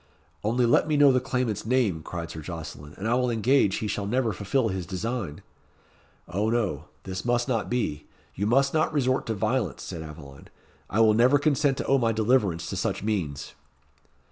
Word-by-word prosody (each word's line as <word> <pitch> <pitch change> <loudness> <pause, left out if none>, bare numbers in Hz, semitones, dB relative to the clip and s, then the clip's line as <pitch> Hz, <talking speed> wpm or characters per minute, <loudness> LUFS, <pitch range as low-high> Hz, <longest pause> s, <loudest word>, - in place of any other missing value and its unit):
"Only 120 +4 +2
let 120 - +3
me 155 -2 +1
know 145 -1 +7
the 130 - +3
claimant's 125 -5 -2
name," 110 -8 +1
cried 85 +1 -6
Sir 80 - -7
Jocelyn, 75 -3 -8
"and 100 - -3
I 115 - +2
will 125 0 +2
engage 115 -2 +3
he 110 - -2
shall 100 -1 -2
never 120 0 +1
fulfill 110 +6 0
his 95 -3 -4
design." 100 -4 -4 0.8
"O 100 +5 -1
no; 100 - -1 0.2
this 95 -1 -5
must 120 +1 +1
not 115 -5 -1
be 80 -12 -2 0.3
you 100 +3 -2
must 135 +4 +3
not 155 0 +2
resort 130 -3 0
to 110 - -1
violence," 110 - -1
said 85 - -6
Aveline. 75 -3 -11 0.4
"I 110 - +2
will 110 -1 +6
never 125 +6 +5
consent 145 -2 +2
to - - -3
owe 135 0 +3
my 115 -2 +1
deliverance 105 -7 +1
to - - -3
such - - -2
means." 90 -10 -2
110 Hz, 190 wpm, -26 LUFS, 90-125 Hz, 0.8 s, know